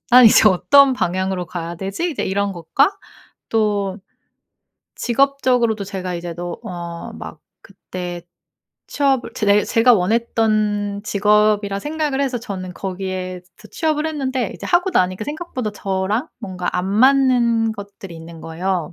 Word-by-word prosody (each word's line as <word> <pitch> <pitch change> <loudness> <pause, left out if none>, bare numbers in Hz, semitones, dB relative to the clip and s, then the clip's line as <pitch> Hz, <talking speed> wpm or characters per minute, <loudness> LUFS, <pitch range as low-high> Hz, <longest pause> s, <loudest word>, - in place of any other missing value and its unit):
'난 250 0 +8
이제 215 -1 +7
어떤 275 +8 +5
방향으로 185 -5 -1
가야 170 -1 -5
되지?' 195 - -3
이제 - - -3
이런 200 +1 -1
것과 190 - +1 0.5
또 205 -3 0 1.0
직업적으로도 245 -4 +1
제가 185 -2 -5
이제 170 -1 -5
너 175 +1 -5
어 170 -1 -7
막 - - -9 0.2
그때 180 -3 -7 0.7
취업을 270 -3 0
제대 205 -1 +3
제가 235 +1 +4
원했던 210 0 0
직업이라 210 -1 +2
생각을 295 +1 -2
해서 265 -3 0
저는 185 -5 -6
거기에서 185 -1 -5 0.2
취업을 315 -1 0
했는데 265 -7 -2
이제 - - -7
하고 360 +2 +2
나니까 185 - +1
생각보다 290 -7 -4
저랑 200 +7 -2
뭔가 180 -2 -5
안 180 - -1
맞는 235 -1 +3
것들이 200 -3 -10
있는 165 0 -11
거예요. 175 0 -3
205 Hz, 290 characters per minute, -20 LUFS, 185-250 Hz, 1.0 s, 난